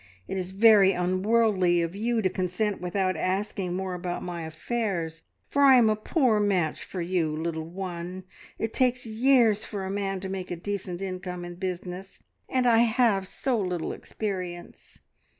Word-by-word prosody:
It - - -4
is 185 -1 -3
very 200 -1 +6
unworldly 185 -1 +2
of 170 +2 -4
you 225 +2 0
to - - +4
consent 185 +3 -1
without 185 +1 0
asking 185 +1 -2
more 190 0 -3
about 175 0 -4
my 170 -2 -5
affairs, 165 -1 -3 0.3
for 285 - 0
I 275 -2 +8
am 230 -3 +5
a - - +2
poor 225 0 +2
match 190 -6 0
for 180 -3 -5
you, 170 -2 0
little 160 0 -3
one. 180 0 -6 0.3
It 225 0 -3
takes 250 -1 +1
years 225 -2 +3
for 200 -3 -5
a 190 - -3
man 195 -1 -2
to 190 - -4
make 190 -1 -5
a 175 - -2
decent 190 0 -4
income 180 -2 -5
in 175 - -7
business, 185 +1 -5 0.3
and 255 -1 +1
I 230 -2 +5
have 225 -4 +3
so 255 +1 -1
little 180 -4 -2
experience. 185 -5 -6
190 Hz, 170 wpm, -27 LUFS, 180-220 Hz, 0.3 s, I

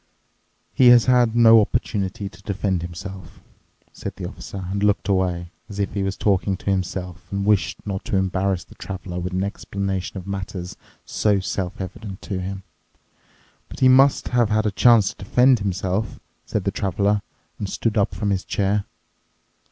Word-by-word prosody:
"He 130 - +5
has 120 -1 +8
had 125 -3 +3
no 115 -1 +8
opportunity 100 -2 -2
to 95 -1 -13
defend 100 -2 -1
himself," 95 +3 -8 0.5
said - - -6
the - - -5
Officer 95 -2 -8
and 100 +1 -2
looked 105 -1 +2
away, 90 -3 0 0.2
as 100 - -8
if 100 -1 -1
he 100 - -1
was 95 0 -2
talking 100 -1 +1
to 100 - -2
himself 90 -2 -4
and 100 0 -2
wished 105 -2 +1
not 95 -2 -3
to 115 - -1
embarrass 95 0 0
the - - -17
Traveler 90 0 -6
with 90 +1 -4
an 95 +1 -1
explanation 100 -1 -3
of 90 - -7
matters 95 -2 -5 0.3
so 105 -2 +1
self 95 -1 -3
evident 95 +1 -7
to 95 -3 -3
him. 95 +1 -5 1.1
"But - - -10
he 130 - +7
must 135 +2 +5
have 120 -3 +2
had 110 0 +1
a 105 - +1
chance 115 -1 +5
to - - -12
defend 125 +4 +4
himself," 95 +2 -2 0.3
said - - -1
the - - 0
Traveler 100 +2 0 0.4
and 100 - -3
stood 115 +2 -1
up 100 -2 +1
from 100 -1 -1
his 95 -1 0
chair. 100 0 0
100 Hz, 175 wpm, -22 LUFS, 95-105 Hz, 1.1 s, has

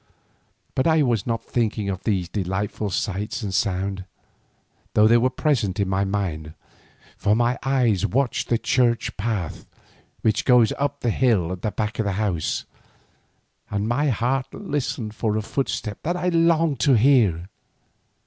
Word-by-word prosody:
But 130 - +1
I 160 -2 +4
was 120 -6 0
not 115 -1 -1
thinking 110 -3 -1
of 95 -2 -3
these 95 -6 0
delightful 100 +2 -3
sights 105 +5 -3
and 100 -2 -3
sounds, 95 0 -1 0.9
though 105 - +6
they 115 +2 +6
were 125 +2 +2
present 125 - 0
in 100 - +1
my 95 +1 0
mind, 85 -6 -3 0.6
for 105 - +2
my 120 +2 +1
eyes 125 -8 +1
watched 130 0 0
the 120 - +3
church 120 0 +1
path 100 -6 -3 0.5
which 110 - +1
goes 125 -4 +5
up 145 0 -1
the 120 - +1
hill 105 -9 +2
at 90 -1 -5
the 110 - -1
back 105 +3 -3
of 110 - +1
the 100 - 0
house, 95 -5 -1 1.0
and 100 +1 -1
my 135 +6 +1
heart 130 +2 -1
listened 140 - -3
for 110 -1 -1
a 110 - -2
footstep 110 -4 -3
that 175 +3 -1
I 180 0 0
longed 165 -4 +2
to 135 +4 +4
hear. 110 -9 +3
110 Hz, 160 wpm, -23 LUFS, 100-130 Hz, 1.0 s, though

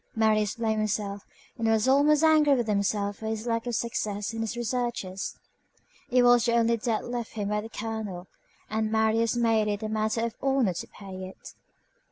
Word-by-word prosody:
Marius 215 -2 +2
blamed 220 -2 0
himself, 205 -1 -2 0.3
and 225 - 0
was 225 +1 +2
almost 290 +3 +4
angry 305 -3 +5
with 240 -2 0
himself 200 -1 0
for 220 - -6
his 220 0 -3
lack 230 0 -1
of 240 - -1
success 210 -2 -2
in 225 - -3
his 225 +1 -3
researches. 240 -5 -3 0.7
It 250 -1 +4
was 245 -1 +5
the 235 - +2
only 230 0 +3
debt 225 -1 -1
left 240 -2 -4
him 205 -2 -3
by 210 0 0
the 220 - -8
colonel, 215 -5 -5 0.4
and 220 0 -1
Marius 220 +1 +2
made 225 -2 +2
it 205 +1 -2
a 215 - -2
matter 220 +1 0
of 230 - -3
honor 265 -8 +2
to - - -6
pay 190 -2 -9
it. 190 - -12
220 Hz, 190 wpm, -27 LUFS, 210-235 Hz, 0.7 s, angry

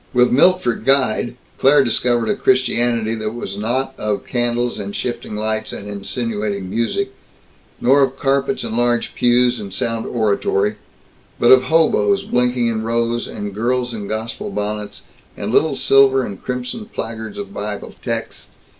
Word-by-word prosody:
With 125 0 +4
Milt 180 +8 +4
for 120 - +2
guide, 130 -3 +1 0.2
Claire 140 +1 +5
discovered 120 -1 +1
a - - +2
Christianity 120 -3 +2
that 110 -1 -3
was 110 -4 -5
not 125 +6 -1
of 105 -1 -2
candles 120 -1 -1
and 100 0 -5
shifting 120 -3 -4
lights 110 +1 -2
and 100 - -7
insinuating 100 -1 -3
music, 390 - -1 0.7
nor 135 +3 +4
of 135 0 +1
carpets 135 0 0
and 110 - -4
large 120 0 +1
pews 120 0 +3
and 100 -2 -7
sound 115 +3 -2
oratory, 105 -2 0 0.6
but 120 - +5
of 130 0 +7
hoboes 165 +5 +3
blinking 125 0 +1
in 115 -1 0
rows, 115 +1 -1
and 105 -1 -6
girls 120 +3 -1
in 105 -3 -5
gospel 115 - -4
bonnets, 105 - -4 0.3
and - - -3
little - - +3
silver 135 -1 +4
and 100 -2 -8
crimson 125 - -4
placards 110 - -6
of 200 0 -7
Bible 105 0 -5
texts. - - -5
120 Hz, 155 wpm, -19 LUFS, 110-130 Hz, 0.7 s, of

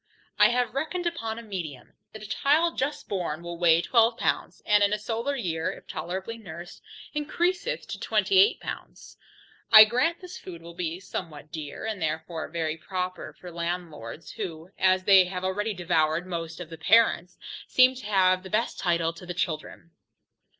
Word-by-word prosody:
I - - +7
have 245 0 0
reckoned 315 +6 -2
upon 230 -10 -2
a 235 - -7
medium, 170 - -7 0.2
that 215 - -10
a - - -7
child 315 +9 +2
just 280 +3 -2
born 170 -5 -3
will 170 0 -6
weigh 170 -1 +5
12 230 -1 +3
pounds, - - -1
and 210 -1 +4
in 200 +1 +3
a - - +1
solar 230 +6 -2
year, 165 -10 -2
if - - -12
tolerably 190 +6 -5
nursed, 175 -4 -10 0.3
encreaseth 355 +9 -1
to - - -5
28 395 +3 +3
pounds. - - -8 0.5
I 215 0 +12
grant 255 +10 +1
this 365 -1 -9
food 170 -3 -10
will 170 0 -10
be 170 0 -3
somewhat 160 -5 -7
dear, 155 +1 -6
and 215 -4 -3
therefore 160 +1 -3
very 160 -1 -2
proper 185 +1 -4
for 180 - -11
landlords, 170 -6 -5
who, 170 -4 -6
as 185 0 +3
they 190 -1 +7
have 180 0 -5
already 205 +4 -1
devoured 165 -1 +1
most 165 -2 -5
of 170 -2 -8
the 165 - -9
parents, 180 0 +3 0.3
seem 255 0 +5
to 255 -4 -10
have 185 -2 +3
the 190 - -10
best 215 +4 -1
title 170 -2 +1
to 175 +2 -12
the 180 - -5
children. 165 0 -4
185 Hz, 175 wpm, -27 LUFS, 170-230 Hz, 0.5 s, I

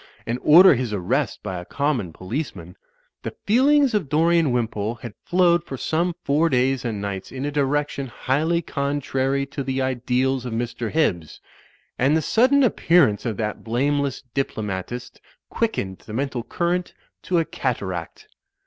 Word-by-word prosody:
and 120 +2 -2
order 175 +5 +8
his 125 -3 -2
arrest 110 +7 -1
by 95 -3 -4
a - - -7
com 145 +5 0
mon 95 -7 -5
policeman, 115 - -6 0.5
the - - -6
feelings 270 +4 +4
of 200 -10 0
Dorian 165 -1 +3
Wimpole 115 -2 -1
had 120 -2 -9
flowed 175 -2 +3
for 135 -5 -7
some 170 +5 -1
four 155 +4 +2
days 130 -1 +1
and 115 -4 -3
nights 100 -2 -5
in 135 +1 -4
a 145 - -2
direction 145 -1 -1
highly 155 +7 0
contrary 140 -1 -1
to 140 0 -5
the 135 0 -2
ideals 130 0 0
of 125 -2 -5
Mr. 120 0 -3
Hibbs, 90 - -1 0.6
and 140 +5 +3
the - - 0
sudden 265 - +4
appearance 160 - +3
of 110 - -3
that 105 -1 -3
blameless 140 +3 0
diplomatist 110 -2 -4 0.3
quickened 100 - -2
the 105 - -11
mental 130 0 -2
current 175 +7 -2 0.3
to 180 - 0
a 165 - +2
cataract. 95 - -4
135 Hz, 155 wpm, -23 LUFS, 115-160 Hz, 0.6 s, order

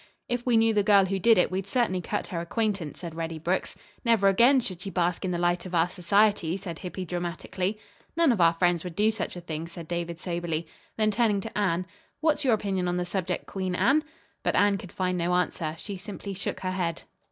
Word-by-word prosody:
"If 245 0 -2
we 240 -2 +5
knew 225 0 +4
the 210 - +3
girl 200 -1 +5
who 195 +1 -1
did 225 +4 +5
it, 180 - +3
we'd 190 +1 -2
certainly 210 -6 +1
cut - - -2
her 170 - -4
acquaintance," 195 -3 -2
said 170 -3 -6
Reddy 165 0 -4
Brooks. 175 +4 -1 0.3
"Never 225 -4 +4
again 240 +8 +5
should 185 -7 -3
she 195 - -4
bask 180 -1 0
in 185 - -1
the 175 - -1
light 175 0 +1
of 180 - -4
our 165 +1 +4
society," 190 -1 +2
said 170 -4 -7
Hippy 185 0 -5
dramatically. 180 +3 -3 0.4
"None 335 -5 +5
of 215 -6 +1
our 165 -1 +6
friends 175 -1 +1
would 180 -3 -7
do 215 +3 +3
such 220 - -3
a 175 - -7
thing," 165 -1 -5
said 170 -1 -9
David 170 0 -3
soberly. 170 -2 -2 0.3
Then, 215 -1 +3
turning 210 -2 +2
to 225 - -8
Anne, 185 -3 +1 0.3
"What's 310 -1 +2
your 250 -5 +4
opinion 195 -4 -1
on 175 - 0
the 180 0 -1
subject, 180 -1 -2
Queen 185 -2 -3
Anne?" 280 +10 +3 0.4
But - - 0
Anne 205 -1 +3
could 190 -6 -10
find 180 -1 -1
no 175 +1 +1
answer. 165 -3 -1
She 200 +3 -6
simply 200 0 -7
shook 185 0 -4
her 185 - -1
head. 175 -3 -2
185 Hz, 225 wpm, -27 LUFS, 175-210 Hz, 0.4 s, our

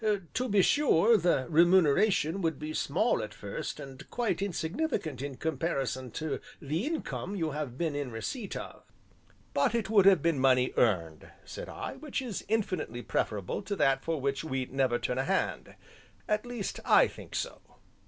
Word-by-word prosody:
To 255 0 -1
be 200 -2 +4
sure 235 - +4
the 170 -9 +2
remuneration 170 +2 +4
would 160 -4 0
be 155 +1 -5
small 180 +13 +1
at 105 0 -6
first 100 -2 -5
and 135 -1 -10
quite 225 -7 -1
insignificant 185 - -2
in 140 -1 -4
comparison 135 -5 -2
to 155 -2 -3 0.2
the 155 - -2
income 300 - -3
you 165 -5 -1
have 140 -4 -4
been 160 -2 -1
in 145 -1 -2
the 120 - -9
receipt 205 - -4
of." - - -8 0.7
"But 240 -4 +2
it 225 -2 -1
would 200 -3 +6
have 190 -7 +6
been 165 -4 +2
money 130 -1 +3
earned," 85 -9 +1 0.2
said - - -7
I, - - -6
"which 290 0 -3
is 245 -7 -4
infinitely 185 - -1
preferable 100 - -2
to 200 0 -3
that 135 -6 +2
for 165 -2 -1
which 140 +2 -1
we 130 -4 -2
never 130 -2 +1
turn 125 +1 -2
a - - +1
hand 190 +6 -1 0.5
at 210 +3 0
least, 240 -5 -4
I - - +6
think - - -10
so." - - -3
160 Hz, 175 wpm, -30 LUFS, 135-205 Hz, 0.7 s, would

